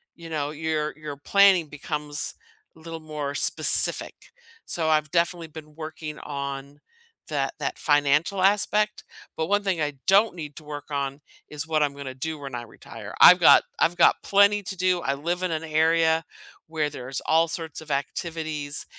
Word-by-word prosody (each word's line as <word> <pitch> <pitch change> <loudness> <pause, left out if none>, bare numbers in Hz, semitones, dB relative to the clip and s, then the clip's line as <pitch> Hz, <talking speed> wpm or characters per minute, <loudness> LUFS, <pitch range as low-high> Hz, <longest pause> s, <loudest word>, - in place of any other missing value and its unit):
you 170 -1 -11
know, 150 -2 -2
your 155 0 -2
your 150 -2 -8
planning 190 0 +4
becomes 150 0 -4 0.4
a 160 - -18
little 165 0 -8
more 150 -2 -5
specific. - - +3 0.5
So 160 -2 -2
I've 155 -1 +2
definitely 170 0 0
been 155 -1 -12
working 155 -1 -7
on 140 0 -6 0.5
that - - -1
that - - -3
financial 150 +6 +2
aspect. 210 +2 +1 0.3
But 160 0 -2
1 205 0 +2
thing 185 -5 -1
I 145 -1 -1
don't 200 +2 +4
need 150 -4 -8
to - - -10
work 145 -1 -7
on 140 0 -3 0.3
is 150 +1 -1
what 155 -1 +1
I'm 145 -1 -1
gonna 140 -2 -7
do 155 +4 -5
when 135 -3 -7
I 120 - -4
retire. 115 -2 -11
I've 180 - +9
got - - +7 0.2
I've 175 +2 +2
got - - +6
plenty 200 +1 +4
to 195 0 -6
do. 180 -1 +1
I 135 - -1
live 170 +6 -3
in 180 - -1
an 160 0 -2
area 160 +1 +2 0.4
where 155 -2 -1
there's 135 -2 -6
all 165 +1 +3
sorts 160 -2 -5
of 155 - -9
activities, 150 0 -3
155 Hz, 175 wpm, -25 LUFS, 145-170 Hz, 0.5 s, I've